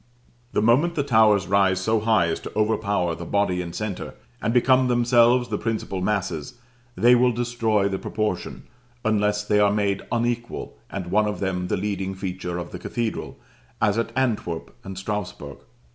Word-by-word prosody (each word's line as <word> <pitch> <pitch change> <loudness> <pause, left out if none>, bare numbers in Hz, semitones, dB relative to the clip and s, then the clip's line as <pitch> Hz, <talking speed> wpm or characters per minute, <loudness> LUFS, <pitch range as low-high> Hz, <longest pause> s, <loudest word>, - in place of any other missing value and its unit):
The 105 - +1
moment 145 +10 +3
the 145 - +1
towers 110 -7 +4
rise 95 -1 +3
so 110 +3 +1
high 110 -4 +3
as 80 - -2
to - - -8
overpower 105 -5 +1
the 85 - -7
body 90 -1 0
and 85 -1 -7
centre, 105 -3 -4 0.3
and 110 - 0
become 130 +1 +4
themselves 120 0 +4
the 105 - -2
principal 110 -4 -3
masses, 90 -6 -2 0.4
they 120 +2 +5
will 125 0 +4
destroy 115 -4 0
the 95 -1 -2
proportion, 105 -4 -3 0.4
unless 105 -1 +1
they 105 0 +2
are 105 -1 +4
made 100 -2 0
unequal, 120 - -2
and 90 -3 -5
one 105 +1 +3
of 105 - -3
them 90 -2 -2
the - - 0
leading 95 -1 -3
feature 90 -2 -4
of 85 0 -6
the - - -7
cathedral, 115 -2 -4 0.4
as 105 -1 +2
at 115 0 -2
Antwerp 110 -10 -2
and 95 -1 -8
Strasburg. 105 0 -5
105 Hz, 170 wpm, -24 LUFS, 95-115 Hz, 0.4 s, they